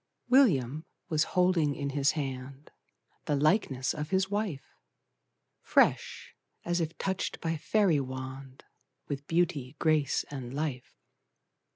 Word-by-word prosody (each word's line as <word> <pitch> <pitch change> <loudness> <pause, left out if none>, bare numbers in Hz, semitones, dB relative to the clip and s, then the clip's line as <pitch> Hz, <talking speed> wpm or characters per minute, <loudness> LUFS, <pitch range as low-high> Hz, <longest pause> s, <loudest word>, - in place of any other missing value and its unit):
William 155 - +4 0.3
was 155 -1 +2
holding 175 -5 +3
in 140 -1 -3
his 140 +1 +2
hand 135 -1 -6 0.5
The 145 - +1
likeness 140 - +1
of 150 0 -5
his 190 0 +1
wife! 200 -10 -2 1.0
Fresh, - - +1 0.3
as 175 0 0
if 160 0 -3
touched 190 -1 -2
by 165 0 -1
fairy 180 0 +2
wand, 130 0 -7 0.4
With 140 0 -5
beauty, 165 -6 0
grace, 155 -3 +1
and 130 -2 -6
life. 145 -4 -4
150 Hz, 115 wpm, -30 LUFS, 135-175 Hz, 1.0 s, William